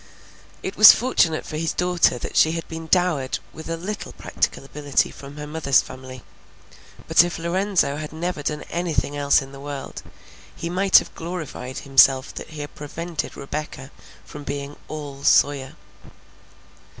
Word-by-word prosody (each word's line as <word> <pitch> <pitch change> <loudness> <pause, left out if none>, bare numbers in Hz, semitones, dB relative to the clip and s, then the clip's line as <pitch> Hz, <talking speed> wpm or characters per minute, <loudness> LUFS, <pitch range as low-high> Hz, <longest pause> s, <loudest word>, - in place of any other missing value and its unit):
It 190 - -4
was 215 -1 +11
fortunate 175 -10 +1
for 155 - -5
his 165 +1 -1
daughter 180 -7 +2
that - - -7
she 160 - +5
had 165 -1 -4
been 160 0 -7
dowered 170 -7 +1 0.2
with 160 +1 -9
a 165 - -2
little 200 +5 -6
practical - - -2
ability 145 0 0
from 140 +1 -11
her 150 - -6
mother's 150 -3 +2
family, 130 -1 -10 0.8
but - - +6
if 175 -1 -3
Lorenzo 170 -3 0
had 155 0 -6
never 165 0 -3
done 150 +1 -3
anything 170 -4 -1
else 140 0 +3
in 135 - -12
the 135 - -11
world, 140 -1 -7 0.5
he 170 - -5
might 190 +2 +5
have - - 0
glorified 160 -7 -6
himself 135 -1 +4
that - - -8
he 155 -2 -7
had 145 - -7
prevented 165 +3 -5
Rebecca 140 -1 -6 0.3
from 150 - -10
being 140 0 -5
all 145 -3 -7
Sawyer. 140 -2 +3
150 Hz, 160 wpm, -23 LUFS, 140-170 Hz, 0.8 s, was